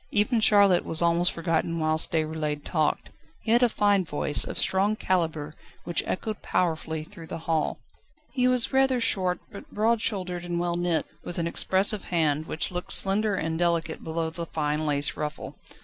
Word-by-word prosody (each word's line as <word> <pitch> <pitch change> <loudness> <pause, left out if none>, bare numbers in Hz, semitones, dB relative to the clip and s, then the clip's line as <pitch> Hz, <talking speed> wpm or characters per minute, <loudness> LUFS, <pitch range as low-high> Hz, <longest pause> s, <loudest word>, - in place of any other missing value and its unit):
Even 220 +3 +1
Charlotte 200 -4 +5
was 165 +1 +1
almost 170 +1 +3
forgotten 165 0 -1
whilst 155 0 +2
Déroulède 155 -2 -2
talked. 155 -3 -1 0.3
He 220 - -1
had 240 +2 +5
a 245 - +4
fine 205 -3 +2
voice, 150 -2 +2
of - - -6
strong 200 +3 +1
calibre, 160 -7 -1 0.3
which 175 - -1
echoed 215 +2 -3
powerfully 160 -2 -1
through 170 -1 -12
the - - -5
hall. 160 -2 0 0.6
He 250 -2 +2
was 250 0 +3
rather 265 -1 +3
short, 185 -6 +1
but 200 - -11
broad 220 +2 +1
shouldered 180 -5 -2
and 175 -1 -3
well 175 0 -1
knit, 175 -2 0 0.2
with 175 - -7
an 170 - -1
expressive 190 +4 +1
hand, 155 -2 0
which 155 - -3
looked 180 0 -5
slender 205 +1 +2
and 160 -2 -2
delicate 170 -2 -1
below 160 0 -3
the 170 +1 -6
fine 150 0 -2
lace 145 0 0
ruffle. 150 0 -6
175 Hz, 175 wpm, -26 LUFS, 160-200 Hz, 0.6 s, Charlotte